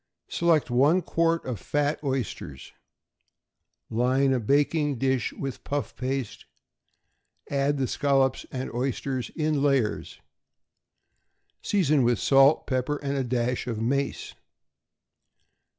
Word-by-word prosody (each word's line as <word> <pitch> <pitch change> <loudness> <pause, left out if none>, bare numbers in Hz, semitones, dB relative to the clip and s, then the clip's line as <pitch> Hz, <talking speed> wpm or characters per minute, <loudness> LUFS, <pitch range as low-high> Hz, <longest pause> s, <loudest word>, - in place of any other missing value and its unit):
Select 165 -6 +2
one 145 +9 +3
quart 165 +1 0
of 125 -5 -4
fat 145 +1 -1
oysters; 125 - -4 1.2
line 130 +4 +2
a 130 - +1
baking 145 +4 +1
dish 130 -2 0
with 135 -2 -6
puff 145 0 -3
paste; 130 -3 -4 1.1
add 140 +1 +1
the 135 - 0
scallops 135 0 +1
and 130 -1 -5
oysters 130 +1 -2
in 155 -3 0
layers; 135 -6 0 1.4
season 155 -8 +2
with 120 -1 +2
salt, 135 +5 +4
pepper, 130 +3 -1
and 140 0 -2
a 135 - 0
dash 125 0 -1
of 115 -3 -3
mace. 140 +5 -2
135 Hz, 110 wpm, -26 LUFS, 125-145 Hz, 1.4 s, salt